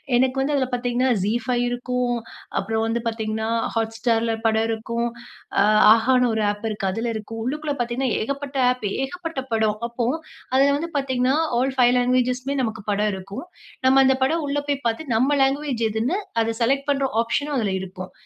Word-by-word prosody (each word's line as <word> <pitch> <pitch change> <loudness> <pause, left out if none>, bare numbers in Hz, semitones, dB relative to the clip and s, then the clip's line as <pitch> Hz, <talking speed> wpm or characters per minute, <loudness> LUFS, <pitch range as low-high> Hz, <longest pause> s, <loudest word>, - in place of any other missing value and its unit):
எனக்கு 260 +2 +2
வந்து 285 +2 0
அதுல 260 -2 +1
பார்த்தீங்கன்னா 245 +1 0
Zee 210 +3 +1
5 245 -1 +1
இருக்கும். 245 0 -1 0.4
அப்புறம் 220 0 0
வந்து 225 +1 0
பார்த்தீங்கன்னா 220 -1 -2 0.3
Hotstarல 225 0 0
படம் 220 0 +3
இருக்கும். 230 +1 -2 0.5
ஆ - - +6 0.3
Ahaன்னு 250 +2 +3
ஒரு 220 - 0
ஆப் 205 +2 -7
இருக்கு 205 -2 -2
அதுல 225 +5 -2
இருக்கும். 220 +1 -6
உள்ளுக்குள்ள 295 +3 -2
பார்த்தீங்கன்னா, 240 +2 -1
ஏகப்பட்ட 280 +3 -4
ஆப் 250 -3 -4 0.2
ஏகப்பட்ட 330 0 -4
படம். 220 -1 +1
அப்போஅதுல 265 +2 0
வந்து 335 +3 -4
பார்த்தீங்கன்னா 260 -1 +1 0.2
ஆல் 265 +1 0
5 245 0 +5
லாங்குவேஜ்ஸ்மே 255 +2 +1
நமக்கு 220 -3 -3
படம் 210 +1 +1
இருக்கும். 195 - -7 0.4
நம்ம 265 +1 +6
அந்த 265 - +4
படம் 315 +3 +1
உள்ள 280 +1 -1
போய் 280 -1 -1
பார்த்து 240 +4 -3
நம்ம 270 +5 +3
லாங்குவேஜ் 270 -3 0
எதுன்னு 225 - 0 0.2
அத 225 0 -1
செலக்ட் 275 +4 +1
பண்ற 275 -1 +1 0.2
ஆப்ஷனும் 285 +5 -1
அதுல 205 -4 0
இருக்கும். 185 0 -8
245 Hz, 165 wpm, -23 LUFS, 225-270 Hz, 0.5 s, ஆ